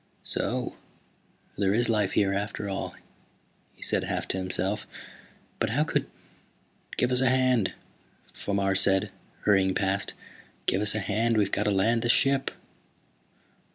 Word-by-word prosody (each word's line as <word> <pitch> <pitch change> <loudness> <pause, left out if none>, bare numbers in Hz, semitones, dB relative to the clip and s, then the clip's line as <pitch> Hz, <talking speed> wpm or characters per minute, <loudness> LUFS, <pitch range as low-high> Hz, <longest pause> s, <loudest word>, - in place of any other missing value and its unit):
"So - - -2 0.9
there 100 0 +2
is 120 +2 +4
life 105 -4 +1
here, 100 -1 +2
after 100 +1 -3
all," 95 0 -4 0.8
he - - -11
said, - - +1
half - - -3
to - - -1
himself. 95 0 -2 0.7
"But - - +1
how 140 +7 +2
could 160 - -1 0.5
" - - -18
"Give 125 - +1
us 125 0 +4
a 130 - +4
hand," 130 -5 +2 0.6
Fomar 100 -1 0
said, 95 +1 +3 0.3
hurrying 95 -2 +3
past. 95 0 -1 0.5
"Give 95 - +1
us 105 0 +3
a - - 0
hand, 110 +3 +1
we've 100 -2 +2
got 105 - 0
to 105 - +2
land 110 +4 +2
the 120 - -1
ship!" 135 +2 +4
105 Hz, 150 wpm, -27 LUFS, 95-120 Hz, 0.9 s, is